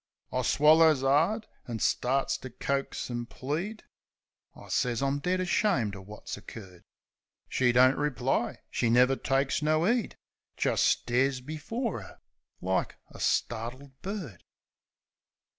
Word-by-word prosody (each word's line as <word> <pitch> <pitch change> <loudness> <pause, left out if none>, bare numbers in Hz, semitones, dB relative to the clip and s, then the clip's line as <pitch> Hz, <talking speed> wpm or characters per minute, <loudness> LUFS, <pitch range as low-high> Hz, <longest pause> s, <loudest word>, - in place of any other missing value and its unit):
I 130 - 0
swallers 155 +2 +5
'ard, 165 - +2 0.2
an' 120 -2 -3
starts 130 +4 +1
to 130 - -8
coax 135 +1 -3
an' 120 0 -3
plead, 165 - -4 0.7
I - - -13
sez 120 -2 0
I'm 140 +1 0
dead 180 +5 0
ashamed 180 - +1
o' 95 - -9
wot's 105 +3 -8
occurred. 95 -4 -11 0.7
She 125 -2 +2
don't 130 +2 +5
reply; 135 -4 -1
she 120 - +1
never 125 +3 +5
takes 135 +2 0
no 155 +3 +2
'eed; 235 0 0 0.4
Jist - - +2
stares 130 +2 +2
before 165 - -4
'er - - -13 0.4
like 95 +1 -1 0.2
a - - -12
startled 120 +5 -1
bird. 185 - -6
135 Hz, 125 wpm, -29 LUFS, 120-155 Hz, 0.7 s, swallers